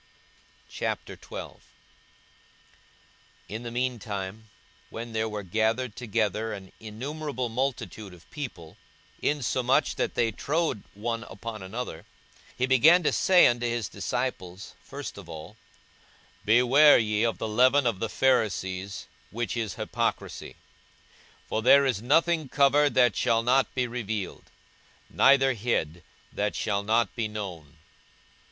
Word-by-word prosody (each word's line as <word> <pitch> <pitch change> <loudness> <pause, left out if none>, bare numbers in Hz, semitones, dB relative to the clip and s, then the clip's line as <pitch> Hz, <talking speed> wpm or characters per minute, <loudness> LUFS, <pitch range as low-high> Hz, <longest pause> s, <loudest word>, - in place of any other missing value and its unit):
42:012:001 - - -6 1.9
In 110 +3 -6
the 120 - -6
mean 125 0 -2
time, 100 +1 -6 0.4
when 115 0 -7
there 110 0 -1
were 105 -1 -5
gathered 110 +5 0
together 110 -2 -1
an 95 -2 -9
innumerable 130 +4 -5
multitude 115 -4 -3
of 90 -1 -16
people, 105 - -8 0.4
insomuch 130 -3 +1
that - - -1
they 115 -1 +2
trode 150 0 -1
one 115 +2 -3
upon 110 +2 -8
another, 95 -2 -6 0.5
he 125 - +2
began 150 +8 +5
to - - +2
say 185 -2 +5
unto 120 0 +2
his 120 -3 -2
disciples 95 -1 -4
first - - -8
of 85 - -12
all, 80 -2 -9 0.9
Beware 125 +7 +6
ye 105 -1 0
of 115 -1 +1
the 110 - -3
leaven 130 +5 +4
of 115 -6 0
the 115 - -2
Pharisees, 100 -7 0 0.2
which 120 +2 -3
is 115 -3 -3
hypocrisy. - - -3 0.9
42:012:002 - - -32
For 110 - -1
there 140 +4 +6
is 120 -7 0
nothing 155 +3 +2
covered, 145 +2 +3
that 125 -6 +4
shall 115 +5 +2
not 130 +2 +3
be 130 -1 +1
revealed; 110 -5 -5 0.6
neither 135 -1 +5
hid, 95 -8 -2 0.3
that 105 0 -1
shall 100 -2 -1
not 110 +3 +1
be 115 -2 -1
known. 90 -8 -7
115 Hz, 130 wpm, -27 LUFS, 105-130 Hz, 1.9 s, Beware